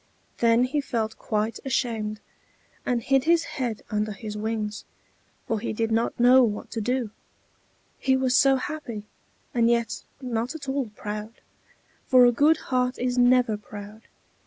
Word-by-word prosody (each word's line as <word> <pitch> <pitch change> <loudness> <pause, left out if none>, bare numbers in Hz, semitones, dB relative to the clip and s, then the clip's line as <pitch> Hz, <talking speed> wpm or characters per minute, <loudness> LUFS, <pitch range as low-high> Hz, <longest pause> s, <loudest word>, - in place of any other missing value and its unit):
Then 230 +1 +4
he 290 +4 0
felt 225 -5 -3
quite 215 +1 -1
ashamed, 225 -5 -2 0.7
and 240 -2 0
hid 270 +1 +2
his 335 0 +4
head 240 -5 -4
under 210 0 -1
his 210 +1 -7
wings, 210 -1 -3 0.6
for 225 - 0
he 230 - -3
did 225 +1 -1
not 230 +2 0
know 250 +2 +7
what 210 -3 -2
to 225 - -3
do; 245 -1 -1 0.9
he 265 -1 +2
was 260 -1 +1
so 270 -1 +5
happy, 250 -6 -5 0.5
and 235 -1 +3
yet 235 -1 0 0.2
not 245 +1 -3
at 285 -3 -8
all 265 -3 -1
proud, 210 +2 -6 0.7
for 255 -2 +7
a 245 - +6
good 295 +6 +4 0.2
heart 250 0 +1
is 250 0 0
never 245 -3 +4
proud. 210 +1 -11
235 Hz, 155 wpm, -25 LUFS, 215-255 Hz, 0.9 s, know